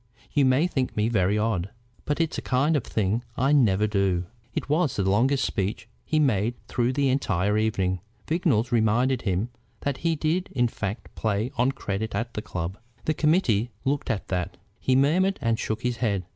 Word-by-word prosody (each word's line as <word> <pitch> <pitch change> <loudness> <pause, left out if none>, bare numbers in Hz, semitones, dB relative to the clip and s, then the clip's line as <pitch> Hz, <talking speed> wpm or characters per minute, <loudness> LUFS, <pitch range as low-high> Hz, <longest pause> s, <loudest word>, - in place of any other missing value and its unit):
You 145 -2 +4
may 130 +5 +4
think 135 -10 -2
me 105 +2 +2
very 100 -2 +2
odd, 105 -4 0 0.4
but 145 - -1
it's 165 -1 0
a - - -6
kind 140 +5 +2
of 140 - +1
thing 110 +3 0
I 135 +3 +2
never 105 -8 +4
do." 100 -4 +1 0.3
It - - -2
was 150 -1 +1
the 95 -2 0
longest 130 +8 +3
speech 100 +2 -2 0.2
he 155 - 0
made 120 -6 +2
through 125 +1 0
the 140 0 +2
entire 105 -7 +1
evening. 95 -4 +1 0.3
Vignolles 150 - +1
reminded 120 +3 +2
him 100 +3 -1 0.3
that 140 -2 -1
he 165 -1 0
did 160 +4 0
in 120 -2 +2
fact 105 0 -5
play 110 +3 -1
on 125 +2 +2
credit 105 0 -3
at 120 +1 -2
the 105 - -3
club. 90 0 -5 0.3
"The 155 - +2
committee 150 - +2 0.2
look 140 +1 0
to 110 - 0
that," 90 0 -2 0.2
he 130 - +2
murmured, 180 +9 +3
and 115 -1 0
shook 110 +2 -3
his 125 -1 0
head. 100 -6 0
115 Hz, 185 wpm, -26 LUFS, 105-140 Hz, 0.4 s, You